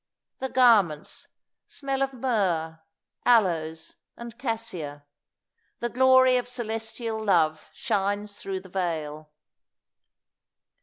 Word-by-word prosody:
The 265 - -3
garments 210 -13 +3 0.4
"smell 275 -1 -3
of 270 0 +1
myrrh, 190 -11 -1 0.4
aloes, 165 -9 +1 0.2
and 235 -1 -8
cassia;" 225 - -5 0.7
the 240 - -2
glory 260 +1 +5
of 245 - -2
celestial 225 -2 -4
love 160 -6 +2
shines 205 -1 -2
through 190 -1 -4
the 185 - -14
veil. 155 -5 -3
210 Hz, 95 wpm, -26 LUFS, 165-245 Hz, 0.7 s, glory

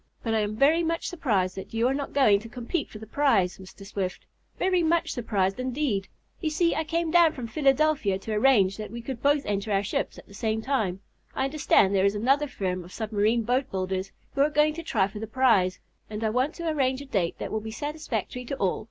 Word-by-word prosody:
But 225 - -1
I 220 - +2
am 210 0 -1
very 295 +8 +4
much 330 0 -1
surprised 210 - 0
that 190 - -7
you 230 +2 +2
are 260 - +1
not 280 0 -3
going 220 -8 +4
to 230 +2 -11
compete 245 +7 -3
for - - -10
the 220 - -9
prize, 220 -8 +2
Mr. 190 +1 -12
Swift. 195 -2 -4 0.3
Very 365 -1 +2
much 335 +1 +1
surprised, 205 -4 -1
indeed! 255 -6 -1 0.3
You 320 - -1
see, 335 +2 +2
I 320 - -1
came 330 +1 -1
down 335 -2 +5
from 250 - -6
Philadelphia 270 -4 +2
to 215 +3 -5
arrange 210 -4 +4
so - - -5
that 210 - -7
we 235 0 -7
could 255 -2 -5
both 285 0 +2
enter 205 +1 -2
our 195 0 +2
ships 200 - -2
at - - -12
the - - -15
same 220 +1 -1
time. 215 -9 -1 0.3
I - - +1
understand 270 -8 +3
there 190 -1 +3
is 200 +1 +2
another 270 +7 +2
firm 185 -7 -3
of 175 - -13
submarine 220 +2 0
boat 250 +4 0
builders 190 0 -3 0.2
who 275 - +1
are 290 - +4
going 300 +1 +3
to 335 - -6
try 210 -12 +1
for 205 +1 -9
the 220 - -5
prize, 220 -7 +3 0.3
and 215 +1 -5
I 220 - +1
want 255 +6 0
to 340 -1 -5
arrange 270 -3 0
a - - -12
date 195 -11 -1
that - - -5
will 220 - -1
be 220 - -6
satisfactory 250 -2 -4
to 275 - -3
all. 195 -8 0
230 Hz, 235 wpm, -26 LUFS, 200-285 Hz, 0.3 s, down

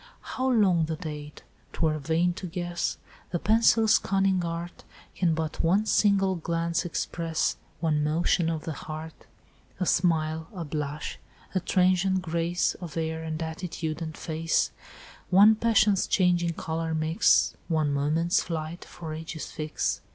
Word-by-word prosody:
"'How 260 0 -2
long 190 -9 +3
the 160 0 -3
date, 150 -3 -8 0.3
'twere 155 -2 0
vain 165 +4 +1
to 185 - -6
guess, 175 0 -3 0.3
The 175 - -1
pencil's 225 +2 +4
cunning 195 -2 +1
art 170 +1 -5 0.3
Can 170 -3 +1
but 160 -1 -2
one 190 +6 +3
single 200 -3 +3
glance 170 +1 -1
express, 165 -1 -1 0.2
One 155 -3 +1
motion 165 +2 +1
of 160 -2 -3
the 160 - -4
heart, 155 +2 -8 0.5
A 185 - 0
smile, 160 -2 +1
a 170 -3 -4
blush, 150 0 -4 0.3
a 190 - +2
transient 185 +1 +2
grace 170 +1 0
Of 170 -3 -7
air 160 0 -2
and 160 -1 -4
attitude 160 -1 -4
and 160 -1 -5
face, 160 0 0 0.6
One 200 +4 +7
passion's 215 -3 +3
changing 175 -3 +2
colour 160 0 -3
mix, 155 +2 +3
One 155 -4 +1
moment's 160 +6 +1
flight, 165 0 -5
for 160 -2 -8
ages 160 0 -6
fix. 155 -1 -2
165 Hz, 140 wpm, -27 LUFS, 160-180 Hz, 0.6 s, One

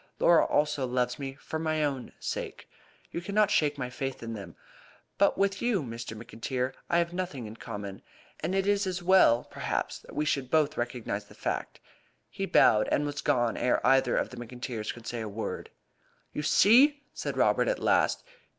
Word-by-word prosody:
Laura 170 -1 +5
also 150 -3 +1
loves 125 0 -1
me 135 -1 -5
for 160 +3 -5
my 155 -1 0
own 135 -4 -2
sake. - - -5 0.4
You 170 - -4
cannot 205 +3 +2
shake 150 -6 +2
my 125 -2 -4
faith 135 -1 -4
in 115 0 -5
them. 100 -6 -8 0.6
But 200 - +4
with 195 -1 +1
you, 230 -9 +1
Mr. 115 -2 -6
McIntyre, 125 +3 -3 0.2
I 170 - +3
have 170 0 +1
nothing 175 -9 -4
in 110 +1 -9
common; 100 -4 -7 0.4
and 175 +5 -2
it 195 0 +1
is 205 -1 +2
as 185 -1 -3
well, 175 -10 +5
perhaps, - - -3
that - - -14
we 150 - 0
should 135 -3 0
both 155 0 +2
recognise 120 -4 -3
the - - -17
fact." - - -3 0.5
He - - -3
bowed, 105 0 +5
and 145 - +1
was 145 -1 -3
gone 120 -2 +1
ere 125 - +2
either 135 -1 +4
of - - -1
the 125 - -10
McIntyres 120 -2 -5
could 120 -1 -12
say 120 -1 -4
a 110 - -4
word. 110 +2 -5 0.6
"You - - -2
see!" 265 - +5
said - - -4
Robert - - +3
at - - +1
last. - - +2
135 Hz, 185 wpm, -29 LUFS, 120-175 Hz, 0.6 s, Laura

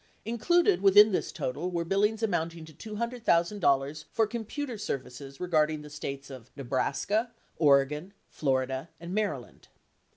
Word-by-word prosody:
Included 235 - +2
within 205 +2 +7
this 185 - -1
total 145 +4 -3
were 170 -2 -2
billings 210 +5 +1
amounting 170 -5 -1
to 155 - -14
$200,000 175 - 0
for 225 - +2
computer 235 +4 -5
services 135 - -6
regarding 155 -4 +1
the 150 - -11
States 140 -2 -6
of 130 -3 -10
Nebraska, 140 - -1 0.3
Oregon, 150 +3 +3 0.2
Florida, 130 +1 -1
and 170 +2 -7
Maryland. 195 - -3
170 Hz, 125 wpm, -29 LUFS, 140-210 Hz, 0.3 s, within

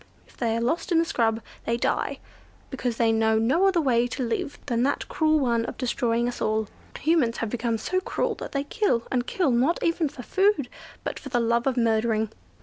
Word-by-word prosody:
If - - -22
they 230 -2 0
are - - -1
lost 320 +10 -1
in 335 - +4
the 330 - +4
scrub 225 -6 0 0.3
they 230 +1 +1
die, - - -1 0.5
because 245 -3 -2
they 230 -1 +3
know 220 0 +3
no 265 - +3
other 375 -3 +3
way 245 -5 +2
to 250 +1 -3
live 235 +4 -2
than 235 -1 0
that 280 +3 0
cruel 310 0 +2
one 235 -4 +1
of - - -6
destroying 240 -2 0
us 245 - -5
all. 215 0 0 0.3
Humans 300 -8 +2
have 225 -2 -3
become 235 -1 -1
so 370 +12 -1
cruel 375 - -1
that - - -5
they 275 -1 -1
kill, 285 - 0
and 245 -1 0
kill, 350 -8 +1
not 255 +8 +2
even 330 -2 +1
for 250 - -10
food, 380 - +2 0.3
but - - -4
for 275 - -9
the 245 -2 +1
love 235 +2 +1
of 260 -2 0
murdering. 220 -1 +1
245 Hz, 215 wpm, -25 LUFS, 230-290 Hz, 0.5 s, in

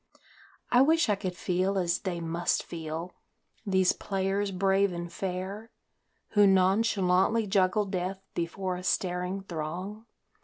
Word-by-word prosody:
I 245 - +6
wish 320 -1 +4
I 205 - +4
could 185 -2 -5
feel 185 +2 0
as 175 -2 +1
they 180 -3 -3
must 170 +1 0
feel, 165 +1 -6 0.5
these 190 -2 +3
players 195 +1 -1
brave 195 +1 +2
and 175 -1 -6
fair, 195 +4 -4 0.6
Who 205 -2 +5
nonchalantly 195 +2 +3
juggle 195 +1 +2
death 190 0 -4
before 180 +2 -3
a 180 - -8
staring 180 +1 -1
throng. 185 +6 -5
190 Hz, 125 wpm, -29 LUFS, 180-200 Hz, 0.6 s, I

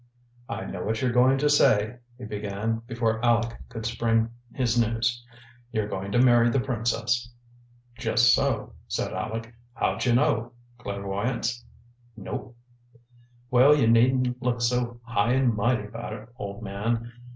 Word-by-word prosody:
"I - - -4
know 90 - -5
what 110 +1 -1
you're 125 -2 +1
going 125 +2 +4
to 145 +2 +1
say," 115 -5 +3 0.2
he 125 - -8
began, 105 +2 -3
before 115 -2 0
Aleck 115 -1 +1
could 115 -2 -7
spring 115 0 +1 0.2
his 125 -4 0
news. 120 +1 +1 0.5
"You're 110 -3 -1
going 95 -1 -5
to - - +2
marry 120 -1 +5
the 135 - +1
princess." 120 0 -1 0.7
"Just 120 +1 +4
so," - - 0
said - - -2
Aleck. 115 +2 -4 0.2
"How'd - - -1
you 120 - +3
know? 120 -4 +1 0.3
Clairvoyance?" 105 +4 -3 0.5
"Nope." 115 +3 -6 1.0
"Well, 130 +4 +6
you 140 -6 +3
needn't 125 +2 +3
look 125 -2 -1
so 120 0 0
high 115 0 +1
and 130 -2 +3
mighty 115 +1 +1
about 110 +1 -7
it, 110 +1 -9
old 100 -2 -7
man. 115 +4 -2
115 Hz, 145 wpm, -26 LUFS, 110-125 Hz, 1.0 s, Well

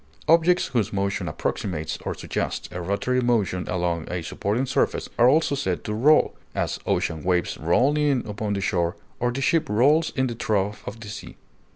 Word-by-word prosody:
Objects 170 +2 +4
whose 110 -4 +1
motion 100 0 -1
approximates 80 -5 -3
or - - -3
suggests - - -3
a 90 - -5
rotary 100 +8 0
motion 110 -7 0
along 85 -3 -1
a 90 -1 -3
supporting 105 +10 -1
surface - - 0
are 120 +2 +7
also 155 +1 +3
said 140 0 -2
to 105 - -3
roll; 145 +8 +4 0.2
as, - - -1
ocean 80 -1 0
waves 90 0 0
roll 125 - +3
in 145 -4 +1
upon 105 0 -3
the 100 - -2
shore, 85 -2 0 0.2
or 120 0 +1
the 135 +3 -3
ship 165 - +2
rolls 145 +10 +3
in 130 -2 +2
the 120 - -2
trough 105 -2 -1
of 115 - -6
the 110 - -8
sea. 105 - -8
110 Hz, 185 wpm, -24 LUFS, 90-130 Hz, 0.2 s, are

